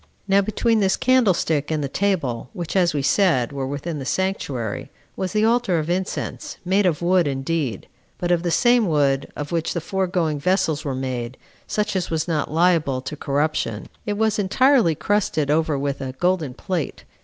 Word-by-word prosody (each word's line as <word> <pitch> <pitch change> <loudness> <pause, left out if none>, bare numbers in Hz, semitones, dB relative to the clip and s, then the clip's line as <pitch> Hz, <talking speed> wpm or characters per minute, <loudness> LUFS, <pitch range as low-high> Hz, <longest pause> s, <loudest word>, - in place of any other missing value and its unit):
8. - - -23
Now 195 +1 +5
between 220 +3 +1
this 195 -2 +2
candlestick 190 - +2
and 155 -2 -1
the - - -1
table, 135 -10 -1
which, 175 0 -5
as 180 -2 +4
we 145 -2 -2
said, 145 -8 +2
were 135 -1 -3
within 145 +3 -4
the - - -5
sanctuary, 135 - -2 0.3
was 185 -2 -3
the 215 0 +2
altar 230 -6 +2
of 160 +1 -1
incense, 185 +2 -3
made 190 +2 +3
of 170 -1 -1
wood 180 -2 +3
indeed, 135 - -2 0.3
but 175 0 -1
of 175 -1 +3
the 175 - -1
same 240 +5 +4
wood 140 -4 +1
of 145 -1 -5
which 165 -2 -1
the - - +1
foregoing 175 -4 -1
vessels 160 -2 +1
were 140 -4 -2
made, 130 -2 -4 0.3
such 210 -1 -1
as 185 -2 -1
was 160 0 -1
not 155 -3 -1
liable 160 -5 +2
to 140 - -6
corruption; 145 -6 -1 0.2
it 205 -1 -1
was 220 0 +1
entirely 225 - +3
crusted 160 -7 0
over 155 -1 +1
with 140 0 -2
a 130 -1 -4
golden 165 -3 0
plate. 175 -2 -3
165 Hz, 185 wpm, -22 LUFS, 140-190 Hz, 0.3 s, Now